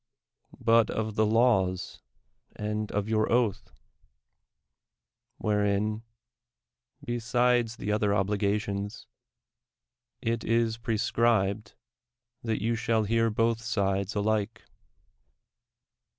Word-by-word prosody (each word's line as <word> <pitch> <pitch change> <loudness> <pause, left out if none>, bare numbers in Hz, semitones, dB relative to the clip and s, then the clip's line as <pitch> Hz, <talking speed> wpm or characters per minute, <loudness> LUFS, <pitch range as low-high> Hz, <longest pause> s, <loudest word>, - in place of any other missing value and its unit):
— - - -50
but 115 -1 +4
of 110 -1 -2
the 110 0 +2
laws 105 -5 +1 0.5
and 105 0 -3
of 105 0 -1
your 110 -1 +1
oatli: 115 -3 0 1.7
wliorcin 105 +1 0 1.0
('besides 120 0 +1
the 105 -2 -3
other 105 -1 +1
obligations) 100 +1 -1 1.1
it 115 0 -2
is 115 0 +1
prescribed 110 -3 0 0.7
that 115 -2 -2
you 115 +1 +1
shall 115 -1 +1
hear 115 +2 +2
both 115 +1 +1
sides 100 -3 -1
alike. 110 +1 -1
110 Hz, 90 wpm, -28 LUFS, 105-115 Hz, 1.7 s, but